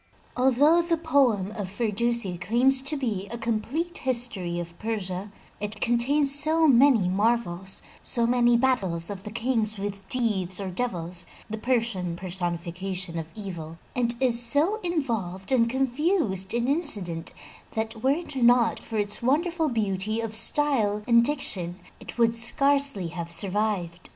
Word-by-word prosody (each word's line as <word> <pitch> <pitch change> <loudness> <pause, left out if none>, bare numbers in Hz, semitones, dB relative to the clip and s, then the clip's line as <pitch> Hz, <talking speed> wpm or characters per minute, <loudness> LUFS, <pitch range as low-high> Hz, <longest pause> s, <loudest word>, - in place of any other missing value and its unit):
Although 270 +7 +4
the 335 0 -1
poem 260 - +1
of 205 -3 -6
Firdusi 220 -2 -1
claims 255 +7 +3
to 285 +3 -4
be 215 -8 -3
a 235 - -6
complete 235 +10 -3
history 235 -9 -2
of 170 0 -8
Persia, 200 -3 -4 0.3
it 210 +1 -4
contains 275 +5 +3
so 315 +3 +4
many 250 -6 +4
marvels, 195 -2 0 0.2
so 235 -2 +1
many 240 0 +3
battles 195 -10 0
of 195 -2 -7
the 210 - -8
Kings 225 -1 -1
with 195 -1 -6
Deevs 200 -7 0
or 195 -2 -5
devils 180 -5 -3 0.2
(the 220 - -4
Persian 225 -8 -1
personification 175 0 -4
of 160 0 -7
evil) 170 -6 -7 0.2
and 235 -1 +1
is 245 -3 +4
so 290 - +3
involved 230 - -3
and 235 -3 +3
confused 260 - 0
in 235 +1 -1
incident, 205 - 0 0.4
that 220 0 -3
were 260 - +1
it 300 +1 -2
not 240 -2 +3
for 225 - -6
its 205 0 0
wonderful 320 +5 0
beauty 215 -2 -1
of 225 -1 -4
style 220 -4 +3
and 235 -1 +5
diction, 190 - -1 0.2
it - - -7
would 230 -1 +3
scarcely 275 -3 +4
have 170 0 -6
survived. 185 -2 -1
225 Hz, 145 wpm, -25 LUFS, 190-260 Hz, 0.4 s, and